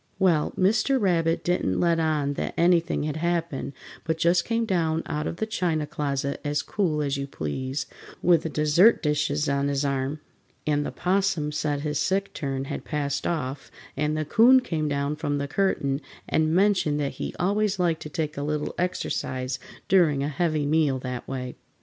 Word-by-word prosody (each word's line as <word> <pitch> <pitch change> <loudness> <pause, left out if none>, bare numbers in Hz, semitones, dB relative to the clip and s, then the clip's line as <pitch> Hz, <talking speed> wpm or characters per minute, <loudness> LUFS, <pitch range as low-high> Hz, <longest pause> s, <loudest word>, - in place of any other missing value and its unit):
Well, 175 -6 +2
Mr. 215 +8 +3
Rabbit 165 -5 +1
didn't 175 - 0
let 170 -1 +2
on 150 -3 +1
that - - -4
anything 170 -2 +3
had 150 0 -2
happened, 170 -4 -2 0.3
but 160 -1 -1
just 170 +1 +3
came 230 0 0
down 165 -5 0
out 150 -1 -2
of - - -3
the 220 - -2
china 175 -8 -1
closet 140 -1 -2
as 145 0 -1
cool 160 -7 0
as 140 -1 -1
you 140 0 -3
please, 130 - -3 0.3
with 175 -1 +4
the 160 - -3
dessert 155 +9 +4
dishes 150 0 +1
on 140 0 +1
his 140 0 0
arm, 140 +2 -1 0.5
and 145 -1 +1
the - - -4
'Possum 180 -5 0
said 145 -1 -1
his 150 -1 -1
sick 195 +1 0
turn 135 -2 -3
had - - -5
passed 140 -2 -2
off, 145 -5 -3 0.3
and 150 +2 0
the 155 - -1
'Coon 240 - +6
came 160 -10 -2
down 140 +1 -1
from 145 -1 -1
the 140 0 -2
curtain 140 -5 0 0.3
and 155 0 +2
mentioned 185 -6 +3
that 140 -2 -1
he - - -4
always 200 +2 +1
liked 170 -3 +1
to 150 - -6
take 155 -1 -3
a - - -2
little 150 +1 -2
exercise 130 -7 -2 0.3
during 160 -8 +4
a 145 - -1
heavy 155 0 0
meal 150 -2 +2
that 125 -1 -5
way. 125 -2 -5
155 Hz, 180 wpm, -26 LUFS, 140-175 Hz, 0.5 s, Coon